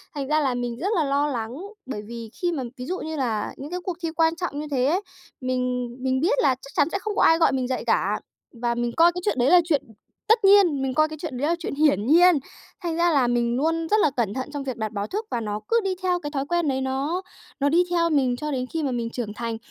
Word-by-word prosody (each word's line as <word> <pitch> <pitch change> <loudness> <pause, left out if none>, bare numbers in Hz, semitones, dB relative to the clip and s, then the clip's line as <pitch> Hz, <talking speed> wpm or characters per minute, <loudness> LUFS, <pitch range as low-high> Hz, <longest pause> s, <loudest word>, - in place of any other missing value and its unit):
Thành 275 -2 -3
ra 305 +1 +2
là 265 -3 +1
mình 245 -1 -3
rất 385 +5 -1
là 325 - +2
lo 285 +1 +1
lắng 235 -5 -3 0.3
bởi 210 -6 -5
vì 230 -1 -7
khi 350 -1 +1
mà 275 -6 -3
ví 250 - -6
dụ 370 +5 -3
như 315 0 -5
là 230 -7 -1
những 290 +4 -8
cái 360 - -2
cuộc 355 -2 -4
thi 330 - 0
quan 325 0 +3
trọng 335 -5 -4
như 300 - -5
thế 255 -2 +1
ấy, 350 +8 +2 0.4
mình 250 -1 -1
mình 260 0 0
biết 415 - +2
là 260 - +3
chắc 270 +2 -14
chắn 290 - +3
sẽ 390 - -1
không 420 +1 -4
có - - +3
ai 325 - +6
gọi 330 - +4
mình 260 -2 -1
dậy 260 - -2
cả. - - +1 0.4
Và 240 -1 0
mình 240 0 -1
coi 335 +1 +6
cái 360 +1 -5
chuyện 415 - 0
đấy 245 +3 +3
là 355 0 +7
chuyện 300 -5 +2 0.5
tất 445 -2 +4
nhiên, 385 -9 +6
mình 265 -1 -1
coi 310 +2 +3
cái 310 - -7
chuyện 295 -7 -5
đấy 285 - 0
là 335 - +2
chuyện 325 - -4
hiển 280 -9 +3
nhiên. 350 +3 +6 0.5
Thành 335 -2 -1
ra 345 0 +3
là 260 -4 +3
mình 240 0 +1
luôn 325 +3 0
rất 430 - +4
là 305 - +4
cẩn 215 -4 0
thận 260 +3 -4
trong 285 -1 -3
việc 260 -4 -4
đặt 220 -1 -3
báo 205 -1 -3
thức 430 +3 -3
và 240 - 0
nó 210 -1 -3
cứ 465 0 +3
đi 380 -1 -1
theo 360 -1 +1
cái 295 -4 -6
thói 275 -2 -2
quen 345 0 0
đấy, 265 -1 0
nó 275 +7 -1 0.4
nó 285 - +2
đi 340 +4 +4
theo 335 -1 +2
mình 265 -5 +2
cho 300 +2 -4
đến 255 -2 -1
khi 320 - -1
mà 275 - 0
mình 235 -1 -2
trưởng 230 -4 -5
thành, 230 +1 -4
285 Hz, 285 wpm, -24 LUFS, 250-335 Hz, 0.5 s, là